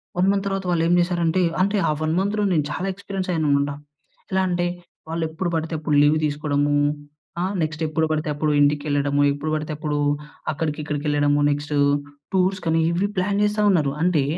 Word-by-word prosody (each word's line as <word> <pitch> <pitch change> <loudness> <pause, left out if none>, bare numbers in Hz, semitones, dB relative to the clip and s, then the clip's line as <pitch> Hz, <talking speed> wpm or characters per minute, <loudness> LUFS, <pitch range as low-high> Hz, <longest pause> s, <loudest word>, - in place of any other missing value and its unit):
1 180 +2 +2
month 200 -1 0
తర్వాత 195 -1 -2
వాళ్ళు 170 -2 +1
ఏం 175 - +3
జేశారంటే. 175 0 +1 0.2
అంటే 200 +2 +2
ఆ - - +3
1 155 0 0
మంత్‌లో 205 +2 0
నేను 155 -3 +2
చాలా 180 +5 -3
ఎక్స్‌పిరియన్స్ 195 -1 -5
అయ్యాను 160 -3 0
అనమాట. 140 0 +2 0.6
ఎలా 190 0 +2
అంటే 175 -1 0 0.4
వాళ్ళు 165 0 -2
ఎప్పుడు 165 +3 -3
పడితే 160 +1 -2
అప్పుడు 150 -1 0
లీవ్ 145 +1 +4
తీసుకోవడము. 145 -1 0 0.7
ఆహ్, 190 +2 -1
నెక్స్ట్ 155 0 -2
ఎప్పుడు 160 +1 0
పడితే 155 0 -1
అప్పుడు 150 +1 0
ఇంటికేళ్ళడము. 145 -1 +1
ఎప్పుడు 145 +2 -3
పడితే 155 0 -3
అప్పుడు 150 -1 -2 0.5
అక్కడికిక్కడికేళ్ళడము. 150 -1 0
నెక్స్టూ 145 +1 -2 0.6
టూర్స్‌కనీ, 185 -3 +1
ఇవి 185 +4 0
ప్లాన్ 200 +2 +1
జేస్తా 210 0 +1
ఉన్నారు. 155 -7 +2
అంటే 175 -5 +3
160 Hz, 165 wpm, -22 LUFS, 150-185 Hz, 0.7 s, లీవ్